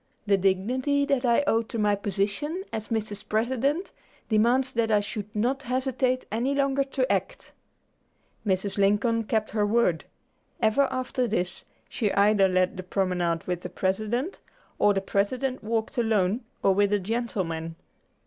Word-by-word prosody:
The 200 -1 +4
dignity 245 +10 +1
that 275 -3 +1
I 240 +3 +3
owe 225 -5 +3
to 230 0 -6
my 210 -1 +2
position, 205 - -2
as 220 0 -4
Mrs. 210 -2 -4
President, 260 - 0 0.4
demands 240 +4 +3
that 230 -1 +1
I 210 -1 +4
should 205 0 -5
not 250 +6 0
hesitate 255 0 0
any 245 +6 0
longer 275 0 +2
to 265 -1 -1
act." - - -2 0.9
Mrs. 200 -1 -1
Lincoln 210 +3 +2
kept 215 0 -1
her 210 -1 +1
word. 205 -6 +2 0.5
Ever 245 +6 +3
after 255 -1 -1
this, 180 -4 -2 0.2
she 210 -4 -1
either 200 -1 +4
led 185 0 +1
the - - -3
promenade 180 -3 0
with 180 -1 -2
the - - -6
President, 215 - -2 0.4
or 205 -1 +4
the 195 - +1
President 250 +7 -1
walked 225 +3 -2
alone 220 0 +1 0.2
or 195 - +5
with 205 +1 +2
a 205 - +3
gentleman. 185 -7 -3
220 Hz, 150 wpm, -26 LUFS, 200-255 Hz, 0.9 s, or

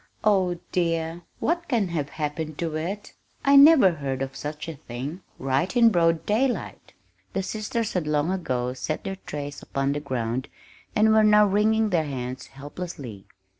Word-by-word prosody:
"Oh, 190 -5 +3
dear! 165 -1 -1 0.2
What 340 +1 -1
can 225 -8 +1
have 150 -4 -2
happened 150 +1 -4
to 165 -2 -2
it? 190 +6 -4 0.3
I 280 0 +6
never 280 - +8
heard 135 -4 -3
of 135 0 -6
such 150 +3 -6
a 165 - -4
thing 140 +5 -7 0.2
right 135 - 0
in 230 -1 +7
broad 165 -3 +2
daylight!" 245 +4 -1 0.4
The 195 - -1
sisters 220 +2 -3
had 175 -5 -1
long 150 +3 +1
ago 125 -9 -1
set 130 +4 -4
their 195 -1 -4
trays 145 -1 -5
upon 135 0 -1
the 145 - -2
ground 130 -3 -3 0.5
and 220 +1 +5
were 220 0 +5
now 210 0 +6
wringing 215 +2 +2
their 165 -3 +2
hands 130 -2 -5
helplessly. 135 - -8
165 Hz, 165 wpm, -25 LUFS, 140-205 Hz, 0.5 s, never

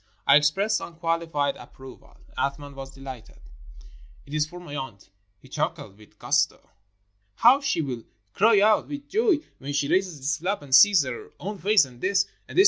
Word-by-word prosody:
I - - +6
expressed 190 +9 +2
unqualified 165 -4 -2
ap - - -14
proval. 130 -1 -14 0.2
Athman 140 +1 -3
was 135 -1 -8
delighted. 135 -4 -11 0.9
"It 140 - -12
is 150 0 +1
for 175 +3 -11
my 150 -5 -9
aunt," 110 -9 -8 0.3
he - - -19
chuckled 95 - -4
with 105 - -19
gusto. - - 0 0.6
"How 255 +4 +5
she 275 - 0
will 125 -5 -5 0.3
cry 220 0 +4
out 215 +1 +3
with 290 0 -7
joy 415 0 +2 0.2
when 140 +1 -6
she 140 0 0
raises 185 -2 0
this 140 +4 -2
flap 185 0 -2
and 135 -2 -8
sees 185 +5 +7
her 130 -3 -7
own 205 +1 -6
face. 205 -5 +4
And 125 -2 -16
this! 195 0 +2 0.2
and - - -9
this! - - +6
150 Hz, 180 wpm, -25 LUFS, 135-200 Hz, 0.9 s, sees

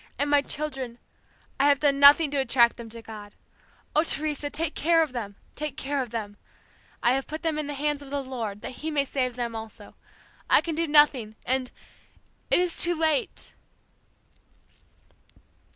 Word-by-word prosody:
and 285 +2 0
my 290 -1 +5
children! 270 -5 -5 0.6
I 280 - +4
have 285 - +4
done 280 -1 +2
nothing 285 +2 +7
to 285 - 0
attract 240 -3 +3
them 235 -2 -9
to 230 0 -9
God. 210 -2 -10 0.6
Oh, 310 - +4
Teresa, 295 -2 -1
take 320 +1 0
care 330 +1 +3
of 300 -5 -6
them! 210 -5 -5 0.2
Take 300 -2 -5
care 280 -1 -2
of 250 - -5
them! 210 -3 -6 0.7
I 240 - +4
have 270 0 -2
put 310 +2 -7
them 320 -2 -1
in 300 - -3
the 290 - -5
hands 295 +1 -1
of 280 - -11
the 280 0 -3
Lord 225 -6 -5
that - - -8
He 315 - -3
may 290 -2 0
save 255 -3 -2
them 240 -2 -4
also. 220 0 -9 0.6
I - - +7
can 330 - -4
do 330 +2 -1
nothing 285 -7 +4
and 255 0 0 0.8
it - - +5
is 355 -2 +1
too 345 0 +1
late!' 315 -2 -1
280 Hz, 180 wpm, -26 LUFS, 240-300 Hz, 0.8 s, nothing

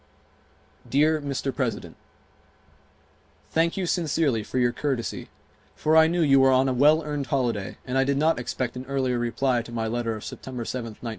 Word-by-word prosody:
Dear 155 +3 +3
Mr. 140 -1 -3
President: 125 -4 -3 1.6
Thank 165 +2 +1
you 190 - -1
sincerely 160 -8 0
for 105 - -5
your 120 -1 +3
courtesy, 130 -3 -3 0.5
for 155 +1 +1
I 160 0 +7
knew 175 +1 0
you 135 -2 +5
were 135 0 +5
on 130 +1 +4
a 130 - +1
well 150 +5 +4
earned 145 -2 -3
holiday 120 -7 -1
and 130 +1 -1
I - - +4
did 140 +1 0
not 155 0 +2
expect 125 0 -3
an 125 +1 -7
earlier 130 -3 0
reply 120 +1 0
to 120 - -11
my 115 -1 -2
letter 115 0 -2
of 110 - -8
September 125 -2 -6
7th, 115 -2 -5
1917. - - -2
130 Hz, 180 wpm, -25 LUFS, 120-150 Hz, 1.6 s, I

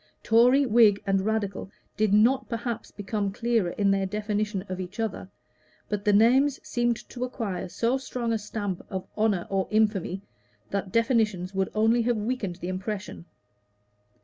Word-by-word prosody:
Tory, 250 +5 +5
Whig, 220 -4 +5
and 195 -1 +2
Radical 200 -2 -2 0.3
did 215 -2 +1
not 230 +6 +3
perhaps 230 0 -4
become 205 0 -3
clearer 230 -3 0
in 200 +2 +1
their 195 -1 +1
definition 210 -1 -2
of 185 0 -5
each 185 +3 -7
other; 220 -4 -3 0.6
but 210 0 -3
the 210 - +4
names 255 +7 +4
seemed 240 -1 +1
to 245 - -5
acquire 220 -8 -4
so 240 +7 0
strong 245 -3 -3
a 225 - 0
stamp 205 -3 -4
of 190 -1 -4
honor 210 -5 +1
or 195 -1 0
infamy, 205 -3 +1 0.5
that 195 -1 -2
definitions 220 -6 +1
would 190 0 0
only 225 +2 +3
have 235 0 +1
weakened 210 -4 -2
the 175 0 -7
impression. 190 0 -5
210 Hz, 155 wpm, -26 LUFS, 195-230 Hz, 0.6 s, Tory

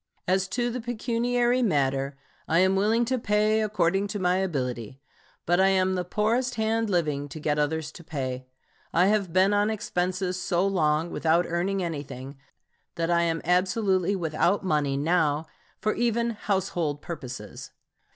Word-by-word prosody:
As 190 +1 +2
to 240 +5 -1
the 250 +1 -4
pecuniary 240 +1 0
matter, 140 - 0 0.3
I 165 - +2
am 190 +2 +4
willing 220 +4 +2
to 255 +1 -1
pay 215 0 +2
according 195 -2 +1
to 205 +1 -4
my 180 0 +2
ability, 130 - -3 0.5
but 175 +2 +2
I 190 - +5
am 190 -1 +2
the 180 -1 -1
poorest 230 +7 0
hand 220 0 0
living 150 -6 0
to 155 - -8
get 150 0 0
others 150 +1 -1
to 170 - -12
pay. 130 -4 -4 0.4
I 175 +2 +4
have 200 -3 +1
been 190 +3 +4
on 205 +1 +2
expenses 185 -3 -2
so 180 +1 +1
long 165 -4 +1
without 165 +2 +2
earning 185 +3 -1
anything 140 -4 -6 0.6
that 165 0 -1
I 170 0 +3
am 165 -1 0
absolutely 185 +1 +2
without 175 +3 0
money 150 -5 +1
now 155 0 +1 0.3
for 215 - 0
even 235 0 0
household 180 -8 -2
purposes. 125 - -7
180 Hz, 155 wpm, -26 LUFS, 155-210 Hz, 0.6 s, I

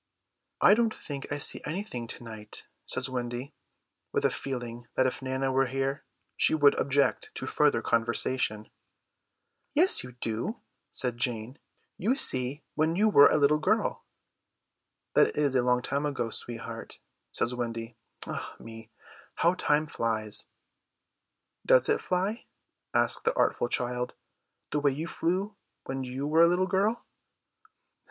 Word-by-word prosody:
"I - - +7
don't 225 0 +1
think 140 -2 -7
I 145 - -1
see 145 - +1
anything 150 - -4
to 120 - -5
night," 110 -2 -8 0.2
says - - 0
Wendy, 125 +2 -5 0.6
with - - 0
a - - +3
feeling 120 -3 -5
that 130 - +3
if 130 - -2
Nana 130 0 -1
were 135 0 +2
here 135 +2 -2 0.3
she - - +3
would 145 -2 +5
object 140 -1 +1
to - - -4
further - - +2
conversation. 115 -1 +1 1.0
"Yes, 350 +6 +6
you 125 0 -10
do," 120 - -3 0.3
says 125 -2 -2
Jane, 120 +1 -2 0.4
"you 230 +8 +1
see 130 - +3
when 160 +2 +1
you 215 +4 +3
were 145 -8 +8
a - - +2
little 150 +1 +3
girl." - - 0 1.1
"That - - +3
is 145 -3 +2
a 130 - +3
long 125 0 +1
time 140 +3 -1
ago, 125 -5 -3
sweetheart," 115 0 -6 0.3
says 120 - -1
Wendy. 115 -1 -4 0.3
"Ah - - -6
me, 115 -1 -11 0.5
how 170 +2 +3
time 150 -4 +1
flies!" 110 -6 -2 1.2
"Does - - +4
it - - +2
fly," 190 +5 -2 0.5
asks - - +3
the 465 +2 0
artful 120 - +1
child, 125 0 0 0.6
"the 150 - +1
way 145 0 +3
you 155 +4 -4
flew 185 +5 -2 0.3
when 135 0 -4
you 130 +2 -4
were 155 +3 +3
a 170 - +8
little 180 +2 +2
girl?" 200 +5 0
135 Hz, 145 wpm, -28 LUFS, 120-160 Hz, 1.2 s, were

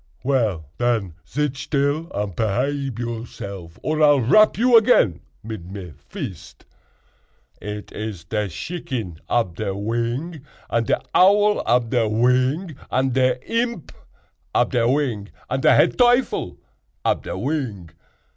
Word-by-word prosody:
"Well, 115 - 0
den, 115 -7 0 0.2
zit 145 0 -1
still 145 +3 -1
and 100 -3 -3
pehabe 130 - -1
yourself, 105 -7 -6
or 155 0 0
I'll 145 -2 +6
rap 215 - +5
you 240 +2 +4
again 215 - +5 0.2
mid 105 -5 -7
me 95 -5 -8 0.2
vist. - - -8 1.0
It 105 0 -6
iz 105 -5 -6
te 105 +4 -2
shicken 110 - -5
ab 95 -8 0
te 110 - -2
wing, 120 - -3 0.3
und 115 -1 +1
te - - +3 0.2
owl 205 +3 +5
ab 120 -2 +2
te 120 -3 +2
wing, 130 - +1
und 130 -1 +1
te 130 -1 +3
imp 230 - -2 0.6
ab - - +3
te 115 -1 +2
wing, 125 -7 0 0.2
und 135 +1 0
te - - +5
head - - +3
teuffel 245 - +2 0.5
ab - - +2
te - - -5
wing. 115 - -3
120 Hz, 135 wpm, -22 LUFS, 105-145 Hz, 1.0 s, I'll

